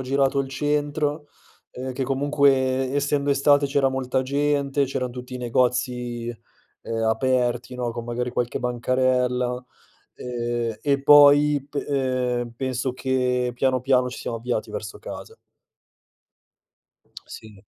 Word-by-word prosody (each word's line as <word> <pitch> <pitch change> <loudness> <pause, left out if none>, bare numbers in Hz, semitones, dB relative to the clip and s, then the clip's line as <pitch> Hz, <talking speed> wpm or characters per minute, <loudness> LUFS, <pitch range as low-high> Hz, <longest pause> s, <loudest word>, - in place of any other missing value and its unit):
girato 135 +1 +1
il 135 -1 -1
centro, 145 +2 -1 0.4
ehm, 130 +1 -6
che 130 +2 -3
comunque 135 -1 +2
essendo 145 0 0
estate 140 +1 +4
c'era 135 -1 +1
molta 130 0 -1
gente, 140 0 0
c'eran 125 -1 -3
tutti 125 +1 -8
i - - -3
negozi, 125 -1 -1 0.5
ehm, 115 0 -3
aperti, 125 +1 0
no, 125 -1 -2
con 115 0 -6
magari 125 +1 -2
qualche 120 0 -2
bancarella, 125 0 0 0.5
ehm, 120 -2 -3
e 140 -1 0
poi 145 0 +6
p 145 - -29
ehm, 130 -4 -1
penso 130 0 -2
che 125 -1 0
piano, 130 +1 +1
piano, 130 -1 +2
ci 125 - -8
siamo 115 - -4
avviati 120 -1 -3
verso 105 -1 -6
casa. - - -9 1.9
Sì. 105 -3 -12
130 Hz, 125 wpm, -24 LUFS, 125-140 Hz, 1.9 s, poi